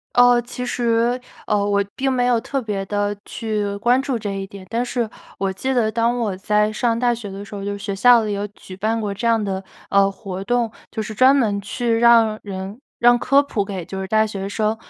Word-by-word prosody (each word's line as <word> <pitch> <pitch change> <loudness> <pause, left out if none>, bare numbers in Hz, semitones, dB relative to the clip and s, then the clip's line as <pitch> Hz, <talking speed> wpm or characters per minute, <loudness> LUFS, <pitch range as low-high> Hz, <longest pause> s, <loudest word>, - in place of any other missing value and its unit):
呃， 245 0 +6
其 250 +1 -6
实， 240 0 +1 0.3
呃， 210 - +3
我 200 0 +2
并 270 0 0
没 245 -1 +1
有 240 -2 +3
特 270 +2 -3
别 200 -3 -3
地 205 0 -1
去 210 -3 -3
关 245 +5 +3
注 270 -2 -2
这 210 -3 -4
一 195 0 -4
点， 200 -1 -11
但 235 +2 0
是 240 -3 -1 0.3
我 195 -1 -1
记 260 +8 -2
得 225 -3 +2
当 230 +2 +1
我 215 -6 -1
在 210 +2 +1
上 230 0 0
大 240 0 +2
学 230 -3 -5
的 195 +1 -7
时 205 - -16
候， 200 -1 -5
就 205 - -2
是 200 - -5
学 200 - -2
校 240 +2 +6
里 210 -1 -2
有 200 +1 -2
举 190 -2 -12
办 220 +3 -1
过 205 -2 -2
这 215 +4 -4
样 230 -1 +3
的， 195 -1 -3 0.3
呃， 200 0 +4
活 195 -2 -7
动。 240 0 +1 0.2
就 220 - -2
是 215 0 -6
专 260 +5 +6
门 210 -7 +1
去 230 +3 -1
让 230 -2 +5
人 195 +3 -6 0.2
让 240 0 +6
科 275 +4 +4
普 225 -8 -2
给 190 -4 -5
就 190 +2 -6
是 190 - -3
大 215 +2 +3
学 195 -2 -4
生 215 +1 0
220 Hz, 250 characters per minute, -21 LUFS, 200-240 Hz, 0.3 s, 呃